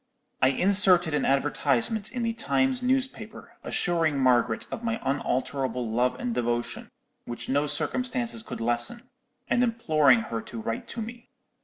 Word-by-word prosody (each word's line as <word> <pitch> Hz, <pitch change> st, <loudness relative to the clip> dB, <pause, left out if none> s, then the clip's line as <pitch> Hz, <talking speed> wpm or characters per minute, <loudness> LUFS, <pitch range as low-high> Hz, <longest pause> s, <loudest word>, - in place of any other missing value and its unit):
"I 130 Hz, -, +5 dB
inserted 180 Hz, +2 st, +4 dB
an 150 Hz, -, 0 dB
advertisement 145 Hz, -, 0 dB
in 245 Hz, -1 st, -3 dB
the 230 Hz, 0 st, -1 dB
Times 260 Hz, +3 st, 0 dB
newspaper, 265 Hz, +1 st, -2 dB
assuring 165 Hz, -4 st, 0 dB
Margaret 125 Hz, -3 st, +2 dB
of 230 Hz, -, -6 dB
my 225 Hz, -1 st, -2 dB
unalterable 130 Hz, -2 st, -2 dB
love 125 Hz, +3 st, 0 dB
and 120 Hz, -, -3 dB
devotion, 120 Hz, 0 st, -3 dB, 0.4 s
which 120 Hz, -, -7 dB
no 145 Hz, +2 st, 0 dB
circumstances 250 Hz, -, +1 dB
could 220 Hz, -, -8 dB
lessen, 120 Hz, -, +1 dB, 0.4 s
and 245 Hz, -, +1 dB
imploring 155 Hz, -, +3 dB
her 115 Hz, -, -2 dB
to 115 Hz, -, -9 dB
write 115 Hz, +1 st, -4 dB
to 230 Hz, -, -5 dB
me. 235 Hz, +2 st, -11 dB
150 Hz, 145 wpm, -26 LUFS, -, 0.4 s, I